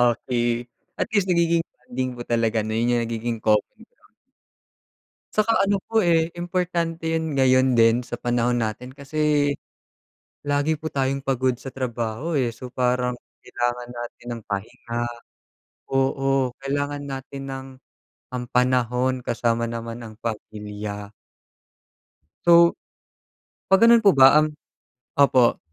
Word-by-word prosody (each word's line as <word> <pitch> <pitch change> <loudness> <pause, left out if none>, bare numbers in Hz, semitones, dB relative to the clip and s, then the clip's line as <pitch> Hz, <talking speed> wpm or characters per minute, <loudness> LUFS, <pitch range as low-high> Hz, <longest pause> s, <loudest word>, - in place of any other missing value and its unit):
okey, 120 -1 -1 0.3
at - - -1
least, 205 -3 +2
nagiging 170 -2 +3
bonding 125 0 -5
po 120 - -6
talaga 115 -2 0
na 110 - -4
yun 120 +2 +1
yung 120 - +1
nagiging 115 0 -3
grounds. 105 -1 +3 1.7
'Tsaka 215 -2 +3
ano 200 -1 +1
po, 225 - +3
eh, 170 -4 +3
importante 170 -2 -2
yun 160 -2 -1
ngayon 130 -1 +4
din 115 +1 +4
sa - - -5
panahon 120 0 0
natin 120 +2 -3
kasi 145 0 +1 1.0
lagi 145 +2 +1
po 160 - -7
tayong 135 -2 0
pagod 130 -2 +1
sa 135 - -9
trabaho, 125 +4 -2
eh. 120 -3 0
So, 125 +2 -9
parang 125 0 0 0.2
kailangan 120 0 -3
natin 120 0 -8
ng 115 -1 -5
pahinga 115 +3 -4 0.8
oo, 135 0 +1
kailangan 145 +1 -2
natin 135 0 -7
ng 135 0 -6 0.6
ang 125 -1 -4
panahon 125 0 +2
kasama 115 0 0
naman 115 0 -5
ang 110 - -11
pamilya. 105 -2 -6 1.4
So, 170 0 +7 1.0
'pag 195 - +7
ganun 235 -1 +6
po 200 - +7
ba 135 0 +7
ang 155 0 +3 0.6
opo. 130 -4 +4
130 Hz, 125 wpm, -23 LUFS, 120-145 Hz, 1.7 s, So